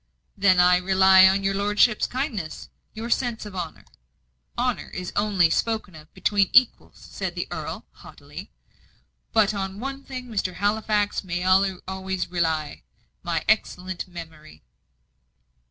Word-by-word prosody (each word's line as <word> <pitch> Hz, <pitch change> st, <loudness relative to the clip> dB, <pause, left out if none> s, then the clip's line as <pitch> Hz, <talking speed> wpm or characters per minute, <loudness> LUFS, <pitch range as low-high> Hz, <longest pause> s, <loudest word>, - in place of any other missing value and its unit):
"Then 190 Hz, -3 st, +4 dB
I 180 Hz, 0 st, +6 dB
rely 190 Hz, +1 st, +6 dB
on 195 Hz, +1 st, +1 dB
your 195 Hz, 0 st, +1 dB
lordship's 210 Hz, +2 st, +2 dB
kindliness 240 Hz, -, -4 dB, 0.3 s
your 230 Hz, +2 st, -5 dB
sense 240 Hz, -4 st, -1 dB
of 205 Hz, -2 st, -9 dB
honour." 175 Hz, -3 st, -6 dB, 0.7 s
"Honour 250 Hz, -1 st, -1 dB
is 180 Hz, -1 st, -5 dB
only 195 Hz, -6 st, +2 dB
spoken 220 Hz, -1 st, -1 dB
of 155 Hz, 0 st, -14 dB
between 200 Hz, -2 st, +1 dB
equals," 255 Hz, -1 st, +3 dB
said -, -, -4 dB
the -, -, -3 dB
earl, -, -, -6 dB
haughtily. -, -, -12 dB, 0.8 s
"But 215 Hz, -2 st, +3 dB
on 195 Hz, 0 st, -4 dB
one 275 Hz, +2 st, -5 dB
thing 255 Hz, -2 st, -7 dB
Mr. 195 Hz, -5 st, -3 dB
Halifax 210 Hz, 0 st, 0 dB
may 180 Hz, -1 st, -3 dB
always 190 Hz, 0 st, 0 dB
rely 160 Hz, -, -1 dB, 0.4 s
my 165 Hz, -2 st, -2 dB
excellent 185 Hz, -4 st, -1 dB
memory." 160 Hz, -, -12 dB
190 Hz, 130 wpm, -24 LUFS, 180-215 Hz, 0.8 s, I